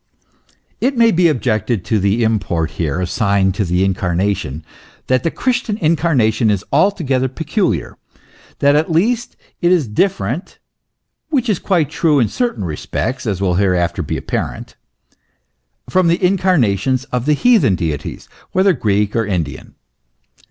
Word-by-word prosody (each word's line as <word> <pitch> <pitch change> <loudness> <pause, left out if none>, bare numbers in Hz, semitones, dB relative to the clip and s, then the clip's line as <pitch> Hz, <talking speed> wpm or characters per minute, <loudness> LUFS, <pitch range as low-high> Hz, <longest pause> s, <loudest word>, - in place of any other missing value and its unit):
It 260 +1 0
may 230 -1 +5
be 175 -2 +3
objected 115 - -1
to 110 - +1
the 100 +4 +1
import 90 -7 0
here 80 0 -2
assigned 95 0 +1
to 105 - -1
the 90 +1 +1
Incar 90 -2 -1
nation, 90 -6 -2 0.4
that 130 -1 +1
the 165 - 0
Christian 245 0 -1
Incarnation 145 - +2
is 100 -2 0
altogether 140 -6 +2
peculiar, 160 - -2 0.6
that 140 0 +3
at 155 +3 +1
least 225 +9 0 0.2
it 175 0 +3
is 170 -8 +2
different 120 - -1 0.7
(which 265 -6 0
is 200 - +1
quite 165 -7 0
true 155 -4 +2
in 115 - +2
certain 240 - -2
respects, 115 - -3
as 100 -3 -2
will 95 -2 +1
hereafter 90 -4 +1
be - - -3
apparent) - - -4 1.1
from 185 -1 +2
the 170 +1 +2
incarnations 130 - +1
of 125 +2 -2
the 150 - +4
heathen 215 - +3
deities, 80 -4 -4 0.3
whether 190 +1 +4
Greek 105 -6 0
or 115 - +2
Indian. 90 -6 -4
125 Hz, 145 wpm, -17 LUFS, -, 1.1 s, may